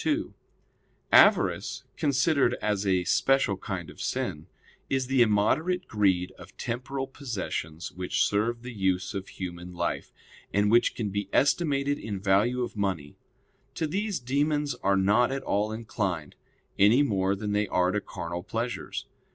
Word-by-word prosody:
2: 315 +1 0 0.8
Avarice, - - +4
considered 140 -3 +2
as 105 -1 -1
a 95 -2 +2
special 135 +3 +2
kind 95 -3 -5
of - - -11
sin, - - -3 0.4
is 135 -1 +1
the 130 0 +2
immoderate 135 - +2
greed 95 -4 +1
of - - -14
temporal 135 +3 -3
possessions 100 - -5
which 90 0 0
serve 115 +3 0
the 125 0 -7
use 95 -2 0
of 95 -1 -4
human 90 -1 -7
life, 85 0 -2 0.4
and 105 +1 +2
which 120 +1 +4
can 105 -4 -2
be 100 0 -3
estimated 145 -1 +2
in 100 -3 -4
value 105 +6 +2
of 120 - -5
money; 95 -8 -2 0.6
to 160 - -1
these 200 +4 -1
demons 145 +3 0
are 100 0 +3
not 105 +6 +3
at 135 0 -3
all 105 +2 0
inclined, 100 -8 -3 0.5
any 110 +8 +6
more 100 -6 +1
than 105 +1 -4
they 105 0 +1
are 90 0 +2
to 105 +1 -1
carnal 85 -3 -5
pleasures. 115 +6 -4
105 Hz, 150 wpm, -27 LUFS, 95-135 Hz, 0.8 s, any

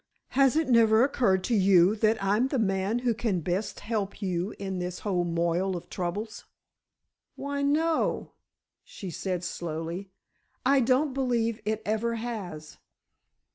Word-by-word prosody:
Has 270 0 +3
it 320 0 +2
never 230 -2 +5
occurred 200 -9 +2
to 245 - -1
you 190 -1 +5
that 220 +1 +3
I'm 210 +6 +2
the 270 - -1
man 195 0 0
who 240 - +3
can 220 -5 -1
best 185 +6 -2
help 205 -2 -3
you 185 -1 -2
in 190 -2 -4
this 180 0 -4
whole 185 -4 0
moil 170 +2 0
of 170 - -11
troubles?" 200 +5 -4 0.9
"Why, 280 0 -3
no," 310 +3 +1 0.5
she 190 -3 -8
said, 180 +1 -3
slowly, 170 +3 -4 0.6
"I 275 +1 +5
don't 260 +3 +2
believe 235 -4 0
it 215 0 -1
ever 220 +2 0
has." 200 -10 -6
210 Hz, 140 wpm, -28 LUFS, 185-240 Hz, 0.9 s, never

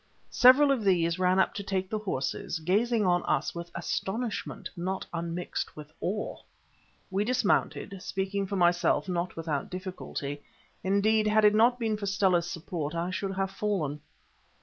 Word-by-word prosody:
Several 265 +3 +7
of 255 -5 +1
these 170 -3 +2
ran 185 0 +3
up 190 - +3
to 200 - -4
take 190 -1 -2
the 215 +2 -2
horses, 170 -5 -2
gazing 210 +7 +1
on 175 -1 +3
us - - 0
with 170 0 -6
astonishment, 205 +6 -3
not 185 +2 -3
unmixed 170 +1 -3
with 150 0 -11
awe. 210 +4 -2 0.7
We 195 +2 +1
dismounted—speaking 200 -4 -1
for 200 - -3
myself, 175 -4 +3
not 175 -1 -2
without 155 -4 -3
difficulty—indeed, 190 +4 -2
had 215 0 +4
it 210 - +6
not 235 +3 +4
been 220 -3 -1
for 205 -1 -4
Stella's 185 -3 +2
support 165 -2 -4
I 170 +2 -1
should 195 +1 -3
have 195 0 -1
fallen. 180 -9 -2
190 Hz, 150 wpm, -29 LUFS, 170-210 Hz, 0.7 s, Several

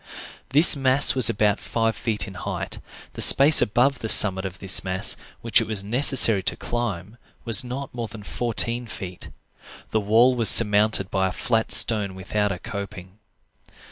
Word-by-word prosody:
This 150 +5 +5
mass 135 0 +1
was 130 -4 +4
about 105 -1 -1
five 115 -1 -3
feet 110 -1 -4
in 95 - -11
height; 90 - -7 0.3
the - - -7
space 145 +3 +7
above 125 +4 0
the 110 - -6
summit 95 -3 +4
of 95 -1 -8
this 95 +1 +2
mass 95 0 0 0.3
which - - +1
it - - -6
was 105 -3 -4
necessary 115 -2 +2
to - - -2
climb 110 -3 -6 0.3
was 115 0 +3
not 130 +3 -8
more 120 -2 -6
than 110 -1 -13
fourteen 120 +2 -3
feet. 90 -4 -10 0.6
The 110 - -1
wall 115 +5 +2
was 115 -3 +2
surmounted 105 -3 +2
by 95 -1 -1
a - - -5
flat 115 +2 -3
stone 105 -5 +1
without 105 +2 -3
a 90 - -5
coping. 100 -2 -10
110 Hz, 170 wpm, -21 LUFS, 100-120 Hz, 0.6 s, space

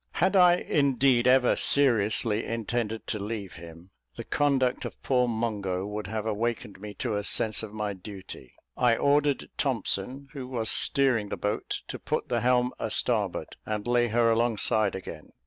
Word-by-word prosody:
Had 190 +2 +1
I, 180 -2 +7
indeed, 135 -6 +2
ever 130 -1 +4
seriously 115 -4 +2
intended 115 -1 -3
to 105 - -3
leave 100 -3 -5
him, 85 +2 -12 0.2
the - - -6
conduct 135 -3 +1
of - - -7
poor 125 -2 +2
Mungo 105 -5 -2
would 105 0 -5
have 110 +1 -4
awakened 110 -2 -3
me 105 -1 -8
to 115 -4 -2
a 105 - -2
sense 110 +1 +1
of 110 -2 -7
my 105 -1 -3
duty. 95 - -11 0.2
I 120 -2 +3
ordered 145 0 +1
Thompson, 130 +1 -1
who 135 -3 -6
was 115 -4 0
steering 130 -6 +1
the - - -5
boat, 105 +1 -2
to - - -6
put - - -3
the - - 0
helm 125 0 +2
a - - -2
starboard, - - -1
and 105 -1 -4
lay 120 0 +2
her 115 +1 +2
alongside 110 -2 +2
again. 85 -4 -9
115 Hz, 165 wpm, -27 LUFS, 105-125 Hz, 0.2 s, I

